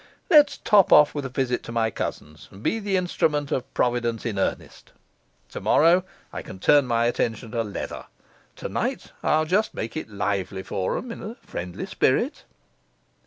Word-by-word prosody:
Let's 295 -3 +6
top 205 -3 +4
off 150 0 +7
with 145 -2 -4
a - - -10
visit 125 -1 -1
to - - -9
my 115 -1 0
cousins, 75 -5 -6
and 95 +3 -14
be 225 - 0
the 200 -2 0
instrument 150 -5 0
of 130 - -2
Providence 120 -2 0
in 105 -4 -2
earnest. - - -4 0.5
Tomorrow 170 +4 +3 0.3
I - - -4
can - - -10
turn 140 +8 +4
my 115 -1 +2
attention 115 -1 -1
to 115 -2 0
leather; 105 -3 -6 0.5
tonight - - -3
I'll 155 +1 +2
just 200 +7 +1
make 115 - -5
it 155 - -5
lively 100 -2 -2
for 95 -1 -2
'em 245 - -6
in - - -8
a 220 +4 -7
friendly 90 0 -5
spirit. - - 0
125 Hz, 165 wpm, -24 LUFS, 110-165 Hz, 0.5 s, off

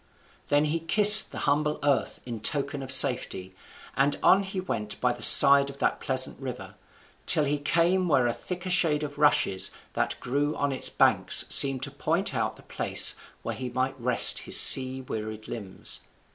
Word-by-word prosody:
Then 145 +1 -1
he 155 +2 -4
kissed 210 +5 +5
the - - -11
humble 150 +1 -3
earth 140 -7 -3
in 120 -3 -9
token 140 +4 -3
of 130 -1 -8
safety, 125 -8 0 0.4
and 140 +1 -1
on 195 - +2
he 190 -1 -8
went 105 - -7
by 125 -1 -2
the 120 - -14
side 140 +2 +8
of 140 - -13
that - - -4
pleasant 130 -1 -3
river, 120 -8 -10 0.5
till 155 - +3
he 145 0 -4
came 170 +5 -2
where 135 -6 -1
a 120 - -3
thicker 180 +5 -9
shade 155 -4 -2
of 145 -1 -10
rushes 145 -10 0 0.2
that - - -4
grew 145 +4 -5
on 145 0 -4
its 130 - -4
banks - - +3
seemed 135 -2 +4
to 140 - -5
point 165 +7 -4
out - - -5
the - - -20
place - - +3 0.3
where - - -7
he 130 -1 -9
might 130 +2 -6
rest 125 0 +2
his - - +2
sea 130 0 +4
wearied 110 -3 -10
limbs. 105 -6 -9
140 Hz, 180 wpm, -23 LUFS, 125-150 Hz, 0.5 s, side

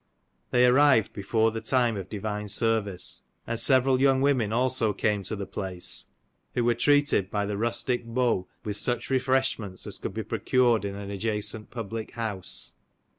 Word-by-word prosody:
They 125 0 +4
arrived 130 -3 +4
before 110 +3 +1
the 115 0 -5
time 120 0 +2
of 95 -2 -6
divine 105 0 -4
service, 105 -2 0 0.2
and 115 0 -2
several 130 +1 +4
young 135 -1 +4
women 130 -6 +2
also 120 -2 +1
came 105 0 0
to 110 - -2
the 100 -1 -5
place, 95 -2 -3 0.5
who 120 - +1
were 120 0 +3
treated 145 -5 +2
by 105 0 -1
the 105 0 -3
rustic 120 +3 -1
beaux 115 -6 0 0.2
with 105 -1 -2
such 120 +4 -1
refreshments 130 -7 0
as - - -6
could - - -5
be - - -2
procured 120 -4 +2
in 100 0 -4
an 100 0 -6
adjacent 105 +1 -3
public 115 -1 -6
house. 110 -5 -3
115 Hz, 165 wpm, -27 LUFS, 105-125 Hz, 0.5 s, They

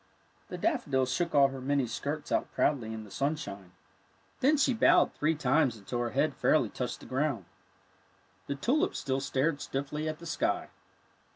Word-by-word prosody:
The - - -6
daffodil 155 - +1
shook 170 +6 -1
all 140 -1 +6
her 135 -1 -7
many 140 0 +1
skirts 145 +6 -4
out - - 0
proudly 120 -7 +1
in 110 -1 -6
the 105 - -14
sunshine. 100 - -3 0.7
Then 295 +4 +4
she 270 -2 +3
bowed 225 - +4
three 155 +2 +1
times 135 -3 +2
until 110 +4 -4
her 120 -1 0
head 145 +4 +1
fairly 155 - +2
touched 125 -1 -4
the - - -11
groimd. 130 -5 -1 1.0
The 140 - -2
tulips 285 - +1
still 135 -1 -1
stared 145 +2 0
stiffly 150 +3 -3
at 155 - -4
the 170 - -12
sky. - - -1
140 Hz, 170 wpm, -30 LUFS, 130-155 Hz, 1.0 s, all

